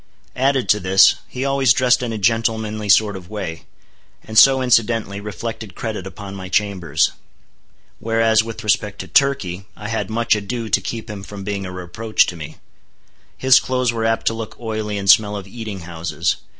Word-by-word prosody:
Added 135 0 +1
to 105 - +4
this, 95 +1 +5
he 130 +2 -4
always 135 -3 +3
dressed 130 -1 +3
in 120 -2 -3
a 110 - -3
gentlemanly 110 0 0
sort 105 +1 +4
of 90 -2 -10
way; 85 -6 -6 0.6
and 110 - -9
so, 135 +4 +7
incidentally, 115 -5 +1
reflected 105 +1 -6
credit 105 -5 -5
upon 100 0 -9
my 95 -1 -8
chambers. 95 -4 +1 0.9
Whereas 115 -1 +2
with 115 0 -7
respect 105 -1 0
to 95 - -9
Turkey, 95 -4 +1
I 105 0 -7
had 110 -1 -2
much 115 +1 +1
ado 110 +2 -4
to - - +2
keep 115 -1 -5
him 105 -3 -7
from 100 0 -9
being 100 -1 -4
a - - -7
reproach 90 +5 0
to 90 - -6
me. 80 -3 -9 0.8
His 130 -1 +6
clothes 125 -2 -1
were 115 -1 -2
apt 115 0 0
to - - +2
look 115 -1 -7
oily 110 -3 -3
and 100 -1 -4
smell 105 +2 +5
of 100 - -7
eating 105 -2 -7
houses. 85 0 -2
110 Hz, 180 wpm, -20 LUFS, 100-115 Hz, 0.9 s, so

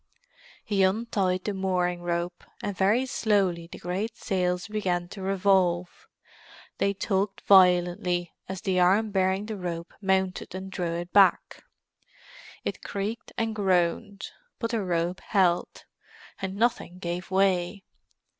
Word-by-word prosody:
He 200 -2 +1
untied 190 -2 +1
the 210 - -2
mooring 180 -2 0
rope, 175 0 -3 0.2
and 205 -1 -2
very 210 +8 +3
slowly 195 -9 +1
the - - -8
great 200 +6 -3
sails 180 0 -1
began 185 -5 -1
to 195 - -9
revolve. 190 -2 +1 0.7
They 200 0 +1
tugged 195 0 -1
violently 180 -2 +4 0.2
as 190 -2 -5
the 185 0 +1
arm 200 +5 +3
bearing 190 +1 +1
the 215 -1 -5
rope 170 -2 -5
mounted, 190 -2 0
and 190 0 -6
drew 175 -3 -2
it 175 +1 -6
back; 195 -3 +4 1.0
it - - -4
creaked 205 +4 -4
and 225 -1 0
groaned, 190 0 0 0.3
but 230 -1 -3
the 230 -2 0
rope 175 0 -1
held, 180 -4 +1 0.6
and 190 0 -3
nothing 220 -5 0
gave 175 0 -4
way. 190 0 +1
190 Hz, 130 wpm, -27 LUFS, 180-200 Hz, 1.0 s, violently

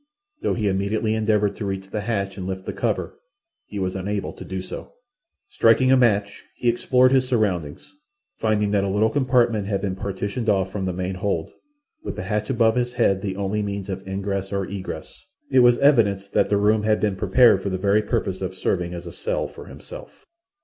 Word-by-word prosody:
Though - - 0
he 105 -3 -1
immediately 100 +3 0
endeavoured 105 -2 +1
to 105 - -4
reach 95 0 -4
the 105 - -2
hatch 100 -3 -2
and 95 -2 -5
lift 95 0 -5
the - - -4
cover, - - -2 0.5
he 105 - -7
was 95 -1 -2
unable 100 +2 -3
to - - -10
do 95 0 -5
so. 95 - -8 0.5
Striking 155 - +4
a - - +7
match, 105 -5 +2
he 120 - +1
explored 125 +2 +3
his 130 -1 +3
surroundings, 95 - -1 0.5
finding 105 -2 +1
that 100 -1 +2
a 100 - -1
little 105 +3 +2
compartment 120 -7 +2
had 100 -2 0
been 95 -1 -2
partitioned 100 +4 -3
off 95 -2 +1
from 95 -1 -3
the 95 - -1
main 90 +1 -3
hold, 95 -4 -2 0.5
with - - -5
the - - -5
hatch 105 -1 -2
above 115 -2 +3
his 125 0 0
head 100 -5 +2
the 95 -2 -3
only 100 +2 -1
means 100 -1 -4
of 95 0 -4
ingress 95 0 -3
or 100 -1 -1
egress. 95 -1 -7 0.3
It 130 - +5
was 120 -1 +6
evident 100 -9 +3
that - - +2
the 100 - +3
room 105 +1 +3
had 105 -1 +2
been 100 0 0
prepared 125 +5 +4
for 100 - -2
the 95 - -2
very 100 +3 +2
purpose 95 -2 -2
of 95 0 -4
serving 90 -1 -1
as 85 - -7
a - - -7
cell - - -2
for - - -12
himself. - - -12
100 Hz, 205 wpm, -23 LUFS, 95-110 Hz, 0.5 s, a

